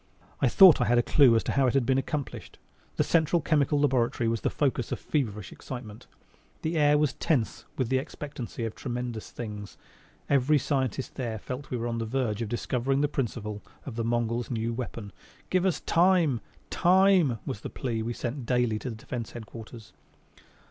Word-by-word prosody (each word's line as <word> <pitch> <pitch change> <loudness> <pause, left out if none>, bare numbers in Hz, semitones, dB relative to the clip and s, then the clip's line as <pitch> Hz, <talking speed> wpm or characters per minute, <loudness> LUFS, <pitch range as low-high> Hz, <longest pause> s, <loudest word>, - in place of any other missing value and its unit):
I - - +4
thought 190 -6 +8
I - - +3
had 120 +3 +3
a 120 - +4
clue 130 -3 +5
as 115 - +2
to - - -2
how 135 -1 +3
it 125 - +1
had 135 -3 +3
been 130 +1 +3
accomplished. 145 0 -5 0.4
The - - +2
Central 165 +1 +2
Chemical 145 -2 +2
Laboratory 125 -4 +1
was 115 -1 0
the - - +1
focus 130 -4 -1
of - - -2
feverish 105 - -2
excitement. 115 -4 -9 0.6
The 160 +2 -1
air 150 -1 +4
was 150 -2 +1
tense 130 -9 -1
with 130 -4 0
the 130 0 +2
expectancy 130 -4 -6
of 110 - -4
tremendous 120 -3 -5
things. 105 -3 -7 0.5
Every 140 +2 +3
scientist 130 -3 -1
there 120 -4 -3
felt 125 +5 -5
that 140 - -17
we 125 - -2
were 115 - -3
on 115 -1 -2
the 115 - -2
verge 115 -3 -1
of 115 - -3
discovering 125 +3 0
the 145 - +3
principle 110 -6 -3 0.2
of 130 - -6
the 115 - -2
Mongols' 120 +1 -1
new 115 -1 -2
weapon. 115 -4 -6 0.4
"Give 185 0 +3
us 185 - -1
time!" 170 - +3 0.3
"Time" 185 -7 +4
was 105 - -4
the - - -5
plea 115 -4 -3
we 115 +2 -2
sent 120 +1 -5
daily 120 -4 +1
to 130 - -5
the 115 - -6
Defense 115 +1 -6
Headquarters. 115 0 -10
125 Hz, 190 wpm, -28 LUFS, 115-145 Hz, 0.6 s, thought